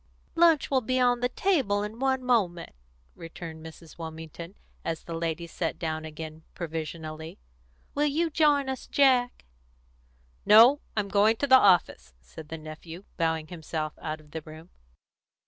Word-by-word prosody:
"Lunch 330 -4 +4
will 265 -1 +3
be 255 +2 0
on 245 -1 +3
the 245 0 0
table 255 - +1
in 215 +2 -7
one 265 -1 0
moment," 195 -9 0 0.4
returned 165 -1 -9
Mrs. 160 0 -13
Wilmington, 160 +2 -8 0.3
as 165 -1 -4
the 170 - -7
ladies 165 0 -3
sat 165 - -3
down 160 -1 -3
again 155 0 -8
provisionally. 160 -1 -6 0.6
"Will 295 +1 +1
you 320 +3 0
join 290 -3 +3
us, 265 -1 -5
Jack?" 255 -3 +2 1.0
"No; 235 +7 +7 0.2
I'm 205 -1 0
going 205 +3 +3
to 285 - -1
the 260 -2 +7
office," 115 - +2
said 150 - -12
the 160 - -5
nephew, 160 +3 -10
bowing 160 -2 -1
himself 160 -2 -4
out 155 0 -4
of 150 -1 -20
the 160 - -5
room. 155 +3 -13
170 Hz, 150 wpm, -27 LUFS, 160-250 Hz, 1.0 s, No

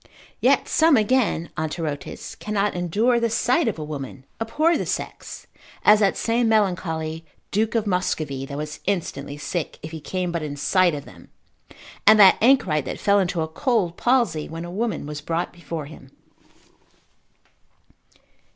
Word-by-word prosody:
Yet - - +3
some 320 -3 +4
again 215 -6 +1
Anterotes, 155 -2 -4
cannot 210 -1 -1
endure 205 +8 +1
the 230 0 +1
sight 245 +6 +1
of 220 - -1
a 155 - -5
woman, 135 -3 -7 0.2
abhor 310 +9 +2
the - - -1
sex, - - -5 0.4
as 210 0 +7
that 200 -2 +2
same 230 0 +1
melancholy 165 -6 0 0.3
duke 220 +3 0
of 225 -2 +1
Muscovy, 155 -8 -1
that 140 - -6
was 150 0 -5
instantly 145 -7 -2
sick, 165 +2 -4
if 155 - -7
he 160 -1 -7
came 180 +2 -3
but 170 -1 -2
in 150 -2 -5
sight 175 +3 +2
of 145 - -7
them; - - -15 0.8
and 215 0 +8
that 195 -2 +8
Anchorite, 195 - +3
that - - -5
fell 200 0 +3
into 180 -3 0
a 160 - -1
cold 185 - 0
palsy, 240 - +1
when 165 +1 -6
a 175 - -7
woman 215 -3 -2
was 150 0 -6
brought 165 +3 -2
before 170 -3 -6
him. 140 -2 -13
180 Hz, 160 wpm, -23 LUFS, 155-220 Hz, 0.8 s, and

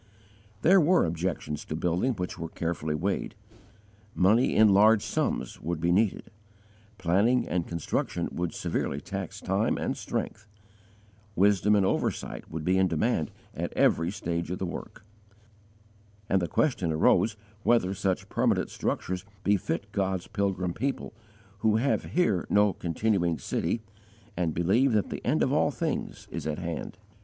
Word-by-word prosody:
There 190 +2 +6
were 175 +4 +4
objections 80 -3 -3
to 75 - -4
building 90 +10 0
which 90 -4 -5
were 80 0 -4
carefully 80 -2 -2
weighed: 95 +6 -2 0.8
money 110 +8 +3
in 110 -1 +6
large 105 +2 +5
sums 65 - -2
would 85 +1 -2
be 85 +2 +1
needed; 100 +2 +1 0.7
planning 100 +8 +2
and 85 -2 -1
constructing 85 +1 -2
would 85 -1 -2
severely - - -2
tax - - -6
time - - 0
and - - -2
strength; 110 - -4 0.9
wisdom 100 +2 +4
and 100 -2 +3
oversight - - -2
would 80 -1 -5
be 95 +1 +3
in 95 - +4
demand 80 - 0 0.2
at - - -4
every 85 +1 +3
stage 85 -4 -3
of 90 - -2
the 95 - -3
work; 90 - -8 1.2
and 95 - +2
the 85 - -1
question 95 - +1
arose 105 +7 +3 0.3
whether 110 -5 +2
such 95 -1 -1
permanent - - +1
structures 90 0 -2 0.2
befit 100 -1 0
God's 95 -2 -1
pilgrim 95 -3 -1
people, 140 +7 -3 0.5
who 110 0 +3
have 130 +5 +1
here 170 - +1
no 105 -1 +4
continuing 85 0 0
city 115 - -2 0.5
and 85 -4 -1
believe 110 +10 +3
that 105 -2 +1
the - - -5
end - - +2
of - - +1
all - - +3
things - - -3
is - - -4
at 75 - -2
hand. 85 0 -5
95 Hz, 150 wpm, -28 LUFS, 85-105 Hz, 1.2 s, There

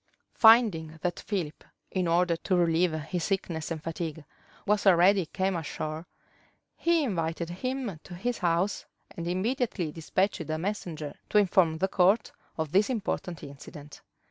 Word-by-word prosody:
Finding 210 -9 +5
that 175 -1 -1
Philip, 175 -7 -4 0.3
in 185 -2 0
order 170 +1 +3
to 185 +3 -1
relieve 170 0 +3
his 160 +3 -3
sickness 170 -5 -2
and 160 -2 -5
fatigue, 160 -2 -5 0.4
was 210 0 +2
already 185 0 +5
come 190 +2 -1
ashore, 155 0 -4 0.7
he 335 -2 +2
invited 170 - -2
him 250 -2 -3
to 175 - -9
his 240 +7 -2
house; 175 +3 0 0.3
and 170 0 -6
immediately 190 - -1
despatched 165 +1 -1
a 155 - -1
messenger 165 -5 -4 0.2
to - - +2
inform 180 -5 +4
the 190 - +1
court 195 +4 +3 0.3
of 160 -2 -2
this 200 +6 +3
important 190 - -3
incident. 145 +1 -11
175 Hz, 145 wpm, -28 LUFS, 160-200 Hz, 0.7 s, Finding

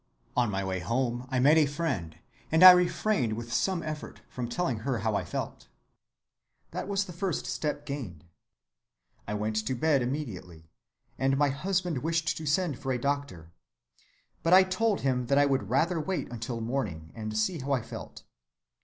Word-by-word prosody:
On 125 -2 +2
my 95 -1 -2
way 95 -1 -2
home 120 +4 -1
I 130 - -1
met 145 +5 +5
a 150 - +4
friend, 135 - -3 0.3
and 160 +3 +5
I 185 - +14
refrained 180 - +2
with 120 +1 -5
some 185 +2 0
effort 155 -1 -6
from 120 -2 -5
telling 150 -6 -1
her 130 +2 -1
how 110 +1 -1
I - - 0
felt. - - -5 1.0
That - - -4
was 200 -1 0
the 180 - -9
first 185 -1 -2
step 150 -1 -3
gained. 115 - -6 1.0
I 105 - -2
went 110 +1 -2
to 110 +4 -1
bed 145 +1 +2
immediately, 95 - -5 0.5
and 135 +1 +2
my 145 0 +3
husband 180 +1 -1
wished 165 +3 0
to 160 - -6
send 150 -2 +1
for 135 - -3
the 125 - +1
doctor. 140 - -3 0.9
But 165 - +2
I 190 - +8
told 195 +3 0
him 125 -2 0
that 140 - +3
I 145 - +6
would 135 -8 0
rather 165 +7 +2
wait 185 -1 -3
until 115 0 -4
morning 105 -11 -3
and 110 -1 -5
see 110 +10 0
how 140 +1 -4
I 130 -4 +1
felt. - - -9
135 Hz, 180 wpm, -29 LUFS, 110-160 Hz, 1.0 s, I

